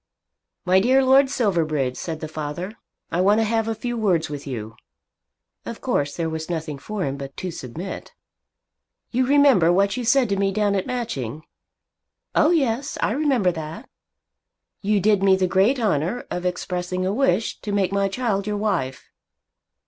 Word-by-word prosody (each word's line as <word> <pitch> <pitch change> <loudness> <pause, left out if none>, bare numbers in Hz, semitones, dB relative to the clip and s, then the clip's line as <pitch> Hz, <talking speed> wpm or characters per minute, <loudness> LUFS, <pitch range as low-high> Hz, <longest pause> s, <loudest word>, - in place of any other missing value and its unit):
"My 185 +1 +5
dear 260 +6 +4
Lord 265 +1 +5
Silverbridge," 155 - 0
said 160 +1 -5
the 155 - -4
father, 155 +5 -5 0.4
"I 175 - +1
want 205 +3 +4
to - - +3
have 225 0 0
a 225 - -1
few 240 +3 -4
words 180 -9 +1
with 145 -1 -6
you." 110 -4 -6 0.9
Of - - -7
course 145 0 -1
there 165 -1 -1
was 160 0 -5
nothing 160 -4 -4
for 210 +5 -4
him 135 0 -3
but 135 -1 -8
to 185 - -4
submit. 165 +7 -7 1.0
"You 255 +1 +1
remember 275 - +5
what 200 +3 +2
you 250 - -2
said 250 +2 +3
to 200 - 0
me 195 0 +1
down 205 0 +1
at 195 -2 -1
Matching?" 155 - -4 0.9
"Oh 305 - +4
yes; 275 -4 0
I - - +2
remember 260 -8 +2
that." 160 - -7 0.9
"You 205 0 +2
did 205 0 +3
me 195 -1 +5
the 190 0 +1
great 195 +9 +2
honour 205 +1 0
of 180 0 -2
expressing 180 0 -3
a 190 - 0
wish 220 -4 +1
to 210 - -4
make 200 -2 +1
my 200 0 +1
child 200 -2 -1
your 210 0 -1
wife." 190 -12 -2
195 Hz, 170 wpm, -23 LUFS, 160-225 Hz, 1.0 s, My